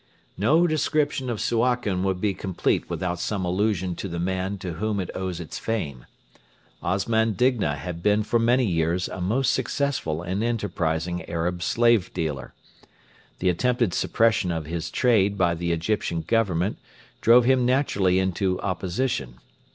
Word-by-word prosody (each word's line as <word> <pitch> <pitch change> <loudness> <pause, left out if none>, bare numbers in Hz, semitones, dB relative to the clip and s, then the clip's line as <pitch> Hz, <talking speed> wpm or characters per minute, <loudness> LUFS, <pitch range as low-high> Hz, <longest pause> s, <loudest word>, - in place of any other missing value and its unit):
No 155 - +3
description 150 -4 0
of 115 -3 -2
Suakin 115 -5 +1
would 95 -1 0
be 100 0 0
complete 95 -1 -1
without 90 -1 -2
some 95 0 -2
allusion 95 0 0
to - - -4
the 85 -2 -5
man 95 +3 -2
to 90 -2 -5
whom 105 +4 -2
it 90 - -3
owes 95 -2 -4
its 85 - -6
fame. 75 - -3 0.7
Osman 110 +4 +1
Digna 115 - +1
had 85 +4 -6
been 105 +3 +3
for 115 +2 +1
many 120 +2 +3
years 85 -1 0
a 90 - -6
most 120 +9 +1
successful 120 - -1
and 95 +4 -2
enterprising 90 -7 -1
Arab 85 +1 -2
slave 115 0 +3
dealer. 75 -7 -3 0.8
The 90 - +1
attempted 120 +2 +1
suppression 110 -5 +2
of 80 -2 -3
his 85 +1 -4
trade 105 -5 +2
by 90 -2 +3
the 85 +1 -2
Egyptian 85 0 -1
Government 100 -2 0 0.4
drove 120 +1 +6
him 130 0 +4
naturally 120 -8 +2
into 95 0 0
opposition. 90 - -2
95 Hz, 150 wpm, -25 LUFS, 85-115 Hz, 0.8 s, drove